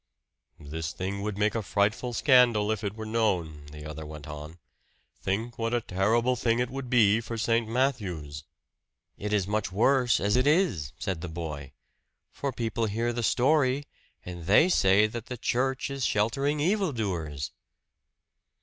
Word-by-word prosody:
"This 80 +2 -5
thing 95 +2 -4
would 105 -1 -3
make 105 0 +2
a 115 - -1
frightful 105 +5 0
scandal 120 -5 +4
if 110 -1 -3
it 100 0 -3
were 110 0 -6
known," 90 -10 -1
the 75 +1 -10
other 75 0 -7
went 75 -1 -9
on. 75 +2 -8 0.6
"Think 110 +6 -2
what 115 +1 0
a 120 - +1
terrible 110 +6 +1
thing 115 -1 +1
it 125 0 -1
would 135 -1 -5
be 115 -3 +4
for 115 0 -6
St. 115 +1 +1
Matthew's!" 95 - -2 0.8
"It 105 +1 -4
is 105 -3 +2
much 105 0 -1
worse 125 +4 +3
as 100 +3 +1
it 130 +2 +2
is," 150 - +2
said 95 -5 -3
the 90 - -4
boy. 75 -4 -6 0.6
"For 140 - -3
people 115 -2 -2
hear 115 +3 -1
the 120 - -2
story, 135 +3 +2 0.4
and 85 -2 -7
they 130 - +6
say 100 - +4
that 110 +1 -5
the 125 - -5
church 130 +4 -1
is 135 -1 -3
sheltering 135 +9 +1
evil 190 +3 +1
doers." 80 - -3
110 Hz, 165 wpm, -28 LUFS, 90-125 Hz, 0.8 s, they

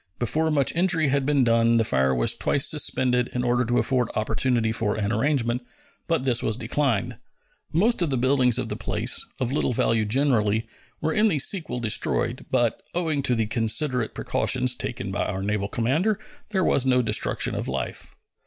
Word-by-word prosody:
Before 155 +7 0
much 145 -2 +1
injury 170 -4 +2
had 140 0 0
been 145 -3 +3
done 115 0 +3
the 115 - +3
fire 65 -9 +1
was - - +2
twice - - +1
suspended 125 -1 +1
in 125 - -1
order 120 0 +1
to 120 +1 0
afford 125 -3 +1
opportunity 110 +1 0
for 110 -2 0
an 105 -1 -2
arrangement, 120 0 0 0.5
but 165 -5 0
this 125 -2 +1
was 110 - -1
declined. 145 +2 -1 0.5
Most 205 +7 +2
of 170 - +1
the 135 - 0
buildings 125 -1 +2
of 125 -2 -2
the - - -4
place, - - 0 0.2
of 125 -1 -1
little 135 -2 0
value 115 -1 +1
generally, 110 -3 +1 0.3
were 160 +1 0
in 215 +1 +3
the 175 -8 +1
sequel 145 -4 +1
destroyed, 120 +1 -1
but, 120 -3 0
owing 160 -5 0
to 125 -3 +1
the 115 -1 0
considerate 115 +2 0
precautions 125 -1 0
taken 120 -5 -4
by 100 - -1
our 95 +1 -3
naval 100 0 -1
commander, 150 - 0 0.3
there 190 -3 0
was 140 - +2
no 125 -1 +2
destruction 105 - 0
of - - -3
life. - - -4
125 Hz, 180 wpm, -24 LUFS, 115-140 Hz, 0.5 s, been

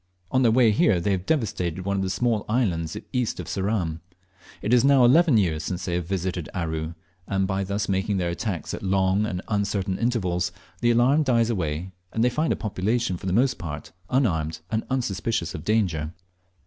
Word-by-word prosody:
On 130 - +3
their 120 -3 +5
way 115 -1 +5
here 105 -2 +3
they 100 +4 0
have 95 -1 -2
devastated 95 - -1
one 100 0 0
of - - 0
the 95 - -1
small 110 +2 0
islands 90 -9 0 0.2
east 125 -3 -1
of - - -4
Ceram. 95 -5 -1 0.6
It 110 - +1
is 125 -1 +5
now 135 -2 +6
eleven 155 +1 +5
years 85 -7 +1
since 90 +1 -4
they 90 - -2
have 85 -1 -2
visited 90 -3 -2
Aru, 80 -2 -3 0.3
and 95 -1 +1
by 95 +1 -1
thus 100 +2 -2
making 95 +1 0
their 90 -2 0
attacks 90 -3 -3
at - - -5
long 95 +2 +2
and 90 -2 -4
uncertain 100 -2 -1
intervals 90 -8 0 0.3
the 120 - +2
alarm 125 +6 +4
dies 120 -5 +2
away, 85 -2 -2 0.2
and 110 - 0
they 125 - +3
find 155 +5 0
a - - +2
population 110 0 -1
for 90 - -7
the - - 0
most 130 +7 +2
part 75 -3 -6 0.2
unarmed 80 - 0
and 110 0 -1
unsuspicious 115 -7 -1
of 75 - -6
danger. 90 -8 0
100 Hz, 195 wpm, -25 LUFS, 90-115 Hz, 0.6 s, now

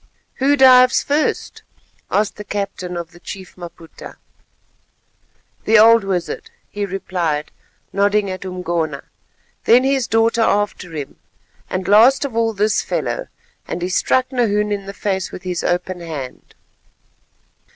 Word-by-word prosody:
"Who 280 +2 +3
dives 255 -1 +6
first," 295 +2 -1 0.5
asked 210 0 0
the 210 - -7
captain 195 -3 -4
of 170 0 -6
the 175 - -16
Chief 190 +1 -9
Maputa. 170 -2 -11 1.5
"The 225 - +5
old 225 +1 +7
wizard," 180 -3 -3 0.2
he 205 -1 -3
replied, 175 -5 -2 0.4
nodding 205 +1 +2
at 185 - -6
Umgona; 170 -5 -3 0.6
"then 245 +2 +6
his 270 -2 +1
daughter 225 +1 +2
after 205 -5 0
him, 145 -3 -6 0.5
and 185 0 -3
last 235 +7 +5
of 260 -5 -6
all 225 -1 +1
this 210 +1 +1
fellow," - - -3 0.4
and 175 - -4
he 180 - -1
struck 255 +8 +1
Nahoon 210 -4 +1
in 200 -1 -3
the 195 - -6
face 190 -2 -2
with - - -9
his 180 -2 -3
open 180 +1 -1
hand. 155 -7 -8
200 Hz, 135 wpm, -19 LUFS, 180-225 Hz, 1.5 s, old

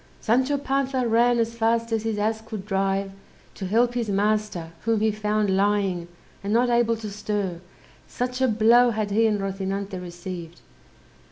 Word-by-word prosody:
Sancho 260 +5 +2
Panza 270 -2 0
ran 235 +2 +3
as 230 0 0
fast 230 0 0
as 225 -1 +1
his 220 -1 -2
ass 220 +1 0
could 220 -3 -7
drive 195 -1 0 0.4
to 190 - -5
help 235 +5 +2
his 235 -3 -2
master, 205 -4 0
whom 225 -1 +2
he 220 +1 +2
found 210 -2 0
lying, 195 -3 +1 0.4
and 200 - -2
not 240 +2 +3
able 235 -1 +3
to 215 -2 -7
stir, 200 -4 -3 0.5
such 250 +1 -3
a 260 - +4
blow 230 +2 +5
had 215 -2 -2
he 225 +2 +3
and 210 -2 0
Rozinante 195 0 -3
received. 175 -1 -8
215 Hz, 165 wpm, -24 LUFS, 195-230 Hz, 0.5 s, blow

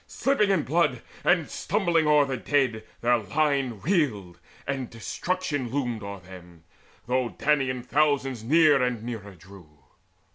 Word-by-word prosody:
] - - -38
Slipping 270 -7 +1
in 190 -6 +2
blood 145 -5 +1 0.2
and 175 -4 +3
stumbling 175 -6 0
o'er 150 -1 +5
the 135 -1 -3
dead 130 -5 0 0.2
[Their 120 0 +3
line 135 -2 -1
reeled,] 125 - -1 0.3
and 135 -3 -3
destruction 145 +3 -3
loomed 120 -4 -2
o'er 100 -1 -7
them, 90 -2 -14 0.4
Though 125 0 0
Danaan 135 -4 0
thousands 135 -4 +1
near 150 +1 +4
and 125 -3 -1
nearer 110 -5 -7
drew. 90 -1 -15
130 Hz, 140 wpm, -26 LUFS, 110-150 Hz, 0.4 s, o'er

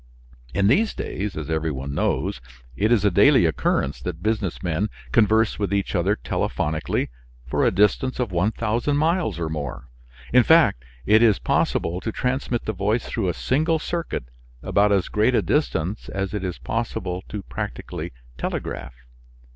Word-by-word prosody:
In 100 - +1
these 200 - +3
days, 100 -2 -4
as 75 0 -4
every 80 0 0
one 70 -1 -4
knows, 65 - -1 0.3
it 110 - +1
is 105 -4 +3
a 100 - +4
daily 120 +5 +6
occurrence 70 -3 0
that 85 -1 -5
business 105 -5 -1
men 90 +4 0 0.2
converse 110 -1 +3
with 100 -2 -1
each 100 -1 0
other, 95 +2 +2
telephonically, 75 - -1 0.4
for 65 - 0
a - - +5
distance 105 +7 +2
of 120 -5 -1
1000 110 +9 0
miles 160 - +1
or 85 -1 -2
more; 70 -4 -5 0.4
in 125 - +8
fact, 120 - +4 0.2
it 110 +2 +5
is 110 -4 +5
possible 85 +2 0
to 110 - -3
transmit 125 0 -1
the 110 - -1
voice 105 +4 0
through 110 -5 -2
a - - -2
single 155 +5 +1
circuit 170 - -3 0.4
about 105 +1 +3
as 100 -3 +2
great 110 +4 +2
a - - +4
distance 105 - -1
as 95 0 -3
it 105 -2 -3
is 90 -2 -3
possible 100 -5 -3
to 105 -1 -5
practically - - -5 0.3
telegraph. - - -4
105 Hz, 165 wpm, -23 LUFS, 85-115 Hz, 0.4 s, in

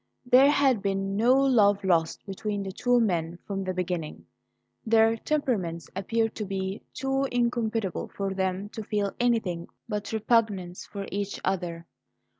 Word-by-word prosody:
There 255 +3 +7
had 275 -6 +3
been 195 0 -1
no 235 +5 +4
love 220 -7 +4
lost 165 -4 +1
between 200 +1 -3
the 195 - -5
two 245 +5 +2
men 170 -6 0
from 195 -1 -3
the 185 - -2
beginning; 180 -3 -3 0.6
their 225 0 +4
temperaments 220 - -2
appeared 225 +3 0
to 215 - -3
be 190 0 -3
too 270 +1 -1
incompatible 235 -4 0
for 195 -1 -2
them 190 +1 -2
to 220 - -6
feel 205 -1 -1
anything 220 -9 0 0.2
but 210 -2 -3
repugnance 215 -5 0
for 200 -1 -6
each 200 0 -3
other. 175 -3 -2
205 Hz, 145 wpm, -27 LUFS, 190-230 Hz, 0.6 s, There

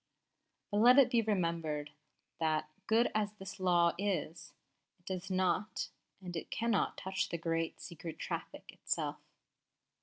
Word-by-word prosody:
_But 205 - +3
let 250 +3 +8
it 275 -3 +7
be 235 - +4
remembered 165 -8 -1 0.5
that, 155 -1 0 0.2
good 230 +2 +4
as 210 -1 0
this 195 -1 -9
law 175 -2 +4
is, 170 -4 -2 0.5
it 175 - -35
does 185 0 -4
not 185 +3 0 0.3
and 180 -2 -6
it 165 - -4
cannot 230 -2 +1
touch 190 0 -2
the 170 - -2
great 165 0 -1
Secret 165 -1 -7
Traffic - - -5
itself. - - -2
180 Hz, 140 wpm, -34 LUFS, 165-205 Hz, 0.5 s, let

